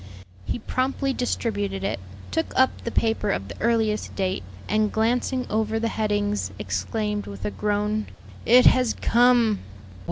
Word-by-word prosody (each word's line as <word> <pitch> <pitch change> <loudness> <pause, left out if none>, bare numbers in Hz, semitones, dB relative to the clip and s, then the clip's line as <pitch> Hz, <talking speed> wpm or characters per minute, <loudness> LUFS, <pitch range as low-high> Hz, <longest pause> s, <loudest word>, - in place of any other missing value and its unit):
He - - -2
promptly 265 +3 -1
distributed 205 -6 -2
it, 195 - -1 0.3
took 325 0 -1
up 260 0 +5
the - - -2
paper 225 -1 0
of 95 +2 -1
the 100 - -9
earliest 220 -2 +1
date, 190 -1 -1 0.3
and 215 0 +1
glancing 245 +3 0
over 220 +1 0
the 230 +1 0
headings, 205 - -1
exclaimed, 205 - -2
with 200 - -8
a - - -1
groan, 210 +1 -1 0.4
"It 250 +2 +6
has 250 -3 +5
come!" 235 -3 +4
215 Hz, 140 wpm, -24 LUFS, 205-240 Hz, 0.4 s, It